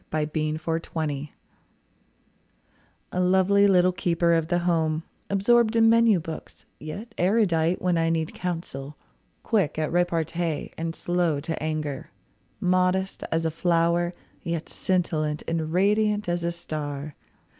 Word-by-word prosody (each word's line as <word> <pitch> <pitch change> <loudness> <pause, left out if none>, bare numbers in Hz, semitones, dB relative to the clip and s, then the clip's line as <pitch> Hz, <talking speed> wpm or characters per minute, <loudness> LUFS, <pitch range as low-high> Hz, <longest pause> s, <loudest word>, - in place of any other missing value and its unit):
A 155 -1 0
MAN'S 155 0 -1
IDEAL 160 -3 -2 1.8
A 180 - -2
lovely 190 +2 +4
little 185 -2 +4
keeper 170 -1 +1
of 165 -1 +1
the 175 0 +1
home, 165 -2 0 0.3
Absorbed 220 +3 +3
in 225 0 +5
menu 230 -4 +5
books, 160 -1 -9
yet 200 +10 -7
erudite 180 -4 +2
When 180 -2 +2
I 165 0 +2
need 160 -1 -1
counsel; 155 -5 -5 0.5
quick 195 -11 +1
at 155 -1 -1
repartee 170 -2 -1
And 165 0 -4
slow 175 -4 0
to 160 +2 -4
anger. 155 -3 -3 0.5
Modest 185 +1 +1
as 165 0 0
a 160 - +1
flower, 170 +1 +1 0.3
Yet 165 -1 -4
scintillant 155 -5 -1
and 160 -1 -2
radiant 210 +3 +2
as 175 0 -1
a 170 - 0
star. 150 -3 -5
170 Hz, 130 wpm, -25 LUFS, 155-185 Hz, 1.8 s, in